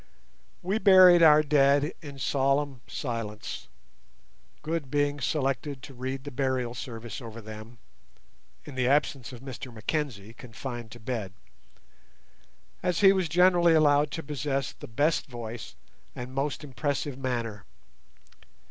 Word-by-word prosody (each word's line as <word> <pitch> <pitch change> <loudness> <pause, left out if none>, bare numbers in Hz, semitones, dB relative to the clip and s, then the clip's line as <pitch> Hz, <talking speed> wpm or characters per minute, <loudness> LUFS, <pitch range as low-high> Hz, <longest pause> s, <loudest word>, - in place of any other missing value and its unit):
We 195 +5 0
buried 185 -4 +8
our 155 -2 +7
dead 145 +1 +3
in 145 -3 -9
solemn 135 0 0
silence, 115 - -5 1.0
Good 155 -3 -3
being 145 0 0
selected 135 -1 -1
to 135 - -10
read 130 +1 -5
the 145 - -7
Burial 130 -2 -1
Service 115 -2 -7
over 115 -1 -8
them 110 +2 -10 0.9
(in 145 - -9
the 130 -1 0
absence 140 -2 +1
of 125 -2 -10
Mr 130 -1 -8
Mackenzie, 115 -2 -3
confined 120 0 -7
to 120 - -11
bed), 110 -5 -4 1.5
as 180 +1 0
he 195 -1 +8
was 185 -4 0
generally 175 0 +5
allowed 145 -1 +4
to 160 - -4
possess 140 -2 -2
the - - -11
best 145 +8 +1
voice 120 -3 -7 0.4
and 125 +1 -7
most 140 +2 -2
impressive 140 0 -2
manner. 115 -5 -3
135 Hz, 130 wpm, -28 LUFS, 120-150 Hz, 1.5 s, buried